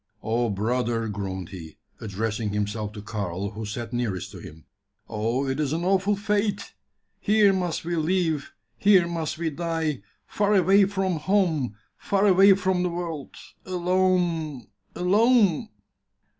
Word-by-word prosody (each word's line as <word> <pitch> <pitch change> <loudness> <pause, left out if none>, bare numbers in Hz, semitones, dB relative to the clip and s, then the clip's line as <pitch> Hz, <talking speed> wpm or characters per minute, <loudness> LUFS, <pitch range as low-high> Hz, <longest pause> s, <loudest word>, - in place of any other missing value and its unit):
"Oh, 115 +1 0
brother!" 115 +2 -1
groaned 95 -3 -5
he, 80 -5 -10 0.2
addressing 110 +1 -3
himself 105 0 -2
to 105 -2 -8
Karl, 100 -2 -4
who 110 +1 -6
sat 115 +2 -5
nearest 115 -7 -2
to - - -10
him, 80 +1 -12 0.4
"oh! 115 +5 -1
it 135 +2 -2
is 150 -1 0
an 165 +2 -2
awful 195 +2 +2
fate! 205 0 -1 0.5
Here 210 -2 +4
must 180 -4 -2
we 175 0 -1
live, 160 -2 0 0.3
here 195 -4 +5
must 165 -3 -3
we 165 -1 -2
die, 160 -4 -2 0.2
far 205 0 +1
away 195 +2 +5
from 190 -3 -1
home, 160 - +1 0.2
far 200 0 +1
away 195 0 +7
from 185 -1 0
the 180 - 0
world 170 -5 -5 0.3
alone 180 -5 0 0.3
alone!" 210 0 +3
160 Hz, 140 wpm, -25 LUFS, 110-190 Hz, 0.5 s, away